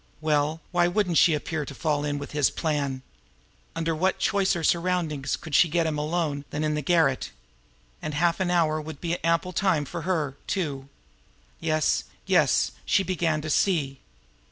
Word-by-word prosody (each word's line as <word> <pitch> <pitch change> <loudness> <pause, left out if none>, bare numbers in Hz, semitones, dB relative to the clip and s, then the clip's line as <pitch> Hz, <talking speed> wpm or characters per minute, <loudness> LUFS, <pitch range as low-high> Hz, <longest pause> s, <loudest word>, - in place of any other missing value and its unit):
Well, 155 +1 0
why 175 -1 +2
shouldn't 180 -4 +2
she 165 - +5
appear 155 +1 -3
to 140 - -8
fall 150 -1 0
in 145 -1 -1
with 145 - -7
his 145 -2 +2
plans? 140 -4 -2 0.7
Under 165 0 -1
what 185 +4 +1
choicer 195 -4 +1
surroundings 170 -4 0
could 160 - -10
she 170 - +5
get 165 +1 +1
him 155 -2 -1
alone 150 -2 -1
than 150 - -3
in 155 0 0
the 150 - -1
garret? 155 -3 +2 0.7
And 150 - -4
half 170 +3 +2
an 185 -1 0
hour 160 -3 +2
would 155 -1 -8
be 170 0 -3
ample 170 +2 +1
time 170 -5 +1
for 170 +4 -6
her, 155 -6 -1
too! 140 -8 -3 0.7
Yes, 155 -2 +1 0.2
yes, - - +3
she 195 - +2
began 165 -4 0
to 155 - -5
see! 145 -7 +1
160 Hz, 170 wpm, -26 LUFS, 150-175 Hz, 0.7 s, she